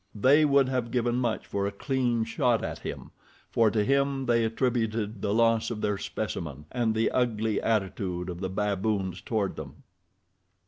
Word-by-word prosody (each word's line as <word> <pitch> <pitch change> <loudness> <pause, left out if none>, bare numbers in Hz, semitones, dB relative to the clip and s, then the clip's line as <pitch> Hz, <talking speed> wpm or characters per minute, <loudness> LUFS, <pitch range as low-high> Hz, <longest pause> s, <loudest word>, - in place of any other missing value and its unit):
They 140 +8 +5
would 140 -2 +4
have 125 -3 -1
given 120 0 0
much 120 -3 -1
for 100 0 -2
a - - -2
clean 120 +1 0
shot 120 0 +1
at - - -4
him, - - -7 0.4
for 115 -1 +4
to 105 -1 +1
him 140 +1 +1
they 115 -1 +3
attributed 110 -3 -1
the 100 - 0
loss 115 +1 +3
of 110 -3 -4
their 105 -2 0
specimen 80 -9 -5
and 115 -3 0
the 110 0 +2
ugly 110 -4 0
attitude 95 -4 -1
of 90 -1 -5
the 95 0 -3
baboons 100 -2 -1
toward 105 -4 -2
them. - - -9
110 Hz, 170 wpm, -28 LUFS, 100-120 Hz, 0.4 s, They